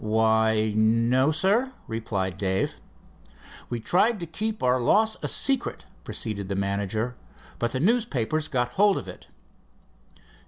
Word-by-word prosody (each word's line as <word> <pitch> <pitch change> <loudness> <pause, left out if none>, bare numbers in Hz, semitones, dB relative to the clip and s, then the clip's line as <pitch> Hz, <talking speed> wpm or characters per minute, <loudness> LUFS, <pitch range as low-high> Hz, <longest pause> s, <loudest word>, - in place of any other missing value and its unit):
"Why, 110 0 +2
no, 115 +5 +3
sir," 200 - +1
replied 100 -4 -3
Dave. 95 -1 -1 0.9
"We 120 - -3
tried 205 - +2
to - - -3
keep 215 +7 -4
our 125 0 +2
loss 220 - +3
a - - -2
secret," 270 -3 0 0.2
proceeded 105 -2 -3
the 100 - -2
manager, 100 +5 -2 0.4
"but 120 - 0
the 130 - -1
newspapers 155 - +1
got 125 -3 -1
hold 200 +8 +3
of - - -6
it." - - -11
120 Hz, 130 wpm, -25 LUFS, 110-185 Hz, 0.9 s, no